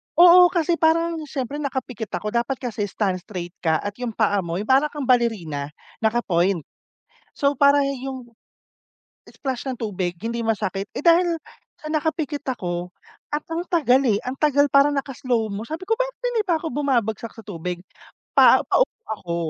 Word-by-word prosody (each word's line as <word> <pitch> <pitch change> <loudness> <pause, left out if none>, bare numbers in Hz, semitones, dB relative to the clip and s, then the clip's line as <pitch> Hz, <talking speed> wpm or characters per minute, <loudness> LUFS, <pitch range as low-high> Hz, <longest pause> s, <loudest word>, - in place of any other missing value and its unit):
Oo, 355 +1 +8
kasi 340 -1 0
parang 330 +1 +2
na 305 - -8
siyempre 275 +1 -4
nakapikit 255 -6 -4
ako. 210 0 -3
Dapat 240 +3 0
kasi 205 -2 -3
stand 190 -2 -1
straight 175 -2 -7
ka 160 -2 +1
at 205 - -2
yung 235 -3 -4
paa 205 -2 +2
mo 170 -2 -3
yung 210 +5 -4
para 270 +3 +5
kang 295 -2 -6
balerina, 215 - +1 0.3
naka-point. 195 -7 +1 0.7
So, 280 -2 0
parang 280 0 +5 0.2
yung 260 -2 -7 1.0
splash 265 -2 -5
ng 260 - -2
tubig 185 -5 -2
hindi 235 +1 -2
masakit. 200 -2 -1
Eh, - - -4
dahil 340 0 +4 0.4
sa 305 0 -8
nakapikit 305 -2 -2
ako, 180 -7 -3 0.4
akong 330 +3 -3
tagal. 270 -7 +3
eh. 205 -3 +3
Ang 255 +2 -4
tagal 285 -1 +3
parang 280 +1 +5
naka 275 0 -2
slow 230 -5 0
mo. 210 +3 -5
Sabi 320 +4 -5
ko, 450 +3 0
"Bakit - - -2
hindi 450 -2 +1
pa 340 - +3
ako 325 - -4
bumabagsak 235 -5 -1
sa 225 - -11
tubig?" 180 -2 -5 0.6
Pa - - +7
paupo - - +1
ako. 175 -5 -4
250 Hz, 170 wpm, -23 LUFS, 205-300 Hz, 1.0 s, Oo